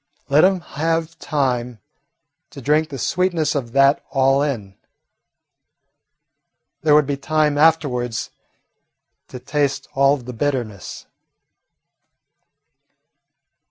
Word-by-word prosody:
Let 145 +3 +5
him 185 -1 +3
have 165 +1 -3
time 125 -5 -1 0.7
to - - -11
drink 150 +4 +1
the 140 - -6
sweetness 170 +1 0
of 125 -5 -3
that 135 +1 +4
all 135 0 +2
in. 110 -10 -3 2.1
There 150 -2 +4
would 150 -1 +5
be 140 0 -2
time 155 +1 +1
afterwards 145 -7 +1 1.0
to - - -9
taste 140 +1 -2
all 140 0 +4
of 130 -4 -11
the 125 - -7
bitterness. 120 -7 -4
140 Hz, 100 wpm, -20 LUFS, 130-155 Hz, 2.1 s, Let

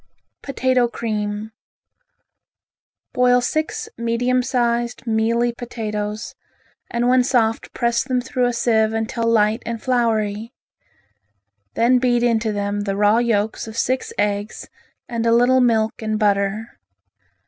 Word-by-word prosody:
Potato 255 -2 +1
Cream 215 -2 -4 1.6
Boil 250 0 +4
six 315 - -2
medium 245 +2 +1
sized, 240 -1 -1
mealy 230 +1 +1
potatoes 215 -2 -5 0.6
and 240 0 0
when 250 0 +4
soft 230 -3 0
press 235 0 0
them 255 -1 0
through 250 0 -1
a - - 0
sieve 225 -2 +1
until 230 +1 -2
light 220 0 +2
and 230 0 -4
floury. 225 -3 -1 1.2
Then 250 +2 +4
beat 245 -1 +2
into 230 -2 +1
them 205 0 -2
the 200 -1 -2
raw 210 +2 +3
yolks 220 -2 0
of 220 +1 -8
six 255 +2 -1
eggs 205 0 -2 0.4
and 235 -2 -3
a - - +4
little 245 +2 +4
milk 225 -3 +1
and 215 -1 -1
butter. 205 +1 0
230 Hz, 125 wpm, -21 LUFS, 215-245 Hz, 1.6 s, Boil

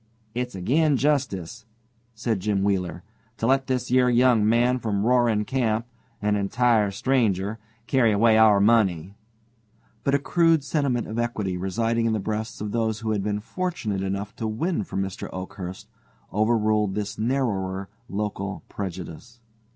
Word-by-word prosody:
"It's 125 -2 -3
agin 140 - +2
justice," 130 - -1 0.5
said 110 -2 -1
Jim 100 0 0
Wheeler, 90 -4 -1 0.3
"to 115 - -2
let 135 +2 +2
this 125 -2 -1
yer 125 0 +4
young 120 -3 +4
man 120 +2 +3
from 105 -3 -1
Roaring 120 -4 +3
Camp 115 -3 0 0.4
an 105 0 +2
entire 110 +1 +2
stranger 105 -2 0 0.3
carry 125 -4 +3
away 110 +2 +4
our 110 -2 +6
money." 100 -5 +2 0.9
But 140 - +2
a - - +5
crude 165 +1 +2
sentiment 140 -5 0
of 110 +2 -4
equity 110 -6 -2
residing 115 +5 0
in 110 - +1
the 110 - 0
breasts 110 +2 -4
of 105 -1 -3
those 110 -1 -1
who 110 -1 -1
had 105 -2 0
been 105 +1 -2
fortunate 125 - -3
enough 100 +2 -3
to 110 - -2
win 115 - -1
from 95 - -2
Mr. 95 -1 -6
Oakhurst 95 0 -7 0.5
overruled 105 -1 +2
this 105 0 -4
narrower 100 -6 -1 0.2
local 100 -1 -4
prejudice. 95 +4 -7
110 Hz, 150 wpm, -25 LUFS, 100-125 Hz, 0.9 s, our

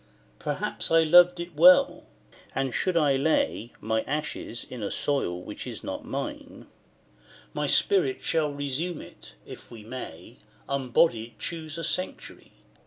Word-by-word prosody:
Perhaps - - -3
I 165 0 +5
loved 175 +2 +6
it 170 -2 -6
well: 180 +4 +6 0.5
and 135 -2 -1
should 185 -2 0
I 145 -4 +3
lay 135 -5 0
My 110 +1 0
ashes 145 -5 -4
in 125 -3 -9
a 100 - -2
soil 135 -12 -1
which - - -8
is - - -7
not - - -5
mine, - - -6 0.9
My 150 0 -1
spirit 145 -2 +2
shall 155 -2 +1
resume 145 +4 -3
it - - -14
if - - -11
we 115 -3 -11
may 115 -3 -9 0.3
Unbodied 125 -4 +1
choose 160 +5 -5
a 165 - -4
sanctuary. 185 +3 -4
145 Hz, 140 wpm, -27 LUFS, 120-165 Hz, 0.9 s, loved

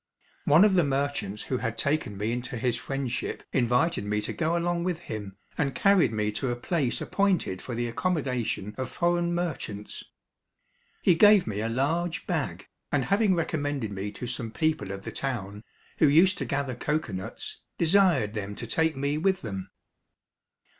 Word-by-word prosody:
One 160 +8 +7
of 210 - +4
the 180 -2 +4
merchants 140 -7 -1
who 130 - -1
had 115 -2 -3
taken 140 -8 0
me 105 +3 -1
into 125 +1 -3
his 120 +1 +1
friendship 130 0 -3
invited 125 +4 +2
me 105 +1 0
to - - -3
go 165 +1 0
along 170 0 0
with 180 -2 -1
him 105 - -7 0.2
and 135 -4 0
carried 195 - +4
me 105 -1 0
to 125 +5 -2
a 120 - 0
place 135 +1 -1
appointed 190 - 0
for 120 - -5
the 120 +1 -1
accommodation 125 - -1
of 130 - -2
foreign 175 0 +1
merchants. 145 - -4 1.0
He 180 - +6
gave 205 +3 +6
me 105 -1 -3
a 115 - -1
large 160 +8 0
bag, - - -2 0.2
and - - +1
having 200 -1 +3
recommended 145 -8 -1
me 100 +1 -4
to - - -6
some 120 -1 -4
people 155 -2 0
of 100 0 -6
the - - -5
town, 105 -6 -4 0.4
who 155 - +6
used 180 +6 +5
to - - -2
gather 140 -2 -1
cocoa 150 -2 -2
nuts, 95 0 -6 0.2
desired 170 - +3
them 105 -2 -4
to 120 - -6
take 160 +7 +1
me 140 +2 0
with 190 +2 +1
them. 95 -4 -5
135 Hz, 175 wpm, -27 LUFS, 110-170 Hz, 1.0 s, One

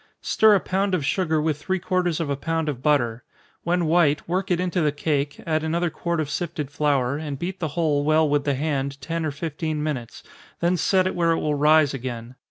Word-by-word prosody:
Stir 215 -1 +5
a - - +3
pound 190 +1 0
of 155 -6 -2
sugar 160 0 +1
with 150 -1 -1
three 190 +4 -1
quarters 180 -2 0
of 165 - -1
a 140 - -1
pound 160 +3 -2
of 135 -5 -3
butter 120 -6 +1 0.4
when 175 0 +1
white, 155 -2 +2
work 185 +3 -1
it 175 -2 +1
into 180 0 0
the 150 -2 +2
cake, 145 -1 -2
add 155 -1 0
another 170 +1 0
quart 170 +1 -2
of 155 - -1
sifted 150 -3 -4
flour, 140 -3 +1
and 150 -3 -5
beat 185 +5 -5
the 165 - -1
whole 150 -4 +2
well 155 +1 +3
with 145 -1 +1
the 140 -1 0
hand 140 -1 -2
ten 165 +4 -3
or 155 - 0
fifteen 155 +1 -3
minutes, 125 -7 -4 0.4
then 175 +1 +2
set 185 +2 +2
it 185 - 0
where 170 -1 +2
it - - -1
will 150 - 0
rise 150 0 +4
again. 120 -2 -6
155 Hz, 220 wpm, -24 LUFS, 145-170 Hz, 0.4 s, Stir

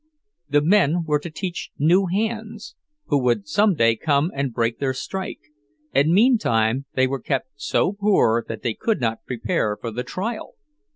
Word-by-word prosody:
The 145 0 +3
men 175 -2 +3
were 150 -1 +1
to 170 - -7
teach 180 +2 -5
new 180 +6 +3
hands, 220 - -3 0.4
who 145 - +3
would 120 -5 0
some 205 - +3
day 115 -5 +3
come 145 +6 +1
and 140 -1 -2
break 115 0 -1
their 130 -2 -1
strike; 190 +8 -5 0.5
and 145 +4 +3
meantime 140 - +3
they 130 - +3
were 135 0 -3
kept 135 -2 -2
so 145 +6 0
poor 200 - +2
that 110 -1 -6
they 115 - 0
could 225 - -1
not 115 -2 -2
prepare 120 - -1
for 115 - -5
the 120 +3 -3
trial! 215 - -5
145 Hz, 170 wpm, -22 LUFS, 120-190 Hz, 0.5 s, The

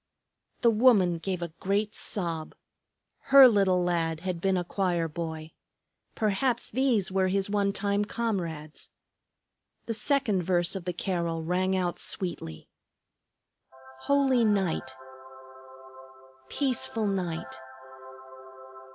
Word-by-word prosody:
The 235 - +5
woman 210 -7 +4
gave 180 0 -3
a 170 -2 -6
great 205 +2 -1
sob. 165 -5 -4 0.7
Her 275 -1 +9
little 195 -5 +2
lad 165 -2 -1
had 180 -2 -4
been 190 0 +1
a 180 - -1
choir 175 -2 -1
boy, 160 -1 -6 0.6
perhaps 230 +4 0
these 235 -6 +1
were 190 0 +1
his 195 +1 -1
one 200 -1 +1
time 200 +1 0
comrades. 170 -10 -4 1.0
The 230 - -3
second 225 -4 +1
verse 175 +1 +1
of 185 -3 -6
the 180 - -1
carol 170 -3 -2
rang 185 +3 0
out 175 -2 -2
sweetly: 80 - -4 1.4
"Holy 275 -4 +3
night! 190 -10 0 1.5
Peaceful 250 -5 0
night! 180 -5 -3
190 Hz, 110 wpm, -27 LUFS, 170-210 Hz, 1.5 s, Her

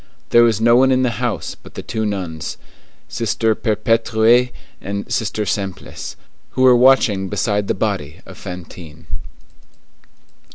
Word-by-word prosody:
There 120 - +7
was 115 -3 +3
no 115 +1 +5
one 130 +1 +5
in 130 0 +3
the 120 -3 -1
house - - -2
but - - -16
the - - -6
two 110 -1 -2
nuns, 90 -6 -4 0.5
Sister 115 -1 0
Perpétue 115 +2 +2 0.3
and 100 +1 -4
Sister 110 -1 -1
Simplice, 95 -1 -4 0.4
who 130 - +3
were 130 -1 +7
watching 120 -6 +4
beside 105 -1 0
the - - 0
body 95 -8 -2
of - - -11
Fantine. 90 -3 -10
110 Hz, 135 wpm, -19 LUFS, 95-120 Hz, 0.5 s, There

